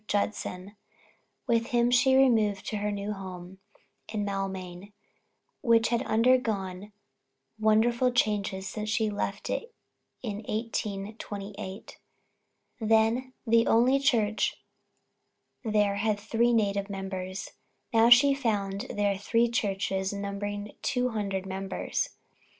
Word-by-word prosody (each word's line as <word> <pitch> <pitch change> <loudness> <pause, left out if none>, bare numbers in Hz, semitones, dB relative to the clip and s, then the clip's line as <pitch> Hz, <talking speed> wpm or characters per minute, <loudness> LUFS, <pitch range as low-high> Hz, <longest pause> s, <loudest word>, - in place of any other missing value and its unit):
Judson 200 -1 -2 0.7
With 230 -2 +1
him 240 0 +2
she 250 +2 +5
removed 220 -7 +3
to 215 - -2
her 210 +1 -1
new 205 +1 -3
home 185 -1 -9 0.5
in 210 -2 -2
Maulmain, 195 -1 -5 0.7
which 230 -2 +4
had 235 0 +1
undergone 215 -5 +1 0.7
wonderful 235 +3 +3
changes 205 -5 0
since 215 +1 -4
she 220 -1 +1
left 200 0 -3
it 485 -2 -4 0.5
in 210 -4 -3
1828. 205 -2 -5 0.8
Then, 225 +3 +2
the 230 0 +4
only 250 +4 +4
church 220 -6 +1 1.1
there 210 -3 +1
had 210 0 0
three 230 +3 +1
native 200 -3 +1
members; 190 -1 -5 0.4
now 225 +1 +6
she 275 +4 +8
found 210 -4 -1
there 200 -1 0
three 230 +3 +2
churches 195 -3 -1
numbering 205 +1 -4
two 250 -2 0
hundred 200 -4 -2
members! 190 0 -3
210 Hz, 110 wpm, -28 LUFS, 200-230 Hz, 1.1 s, she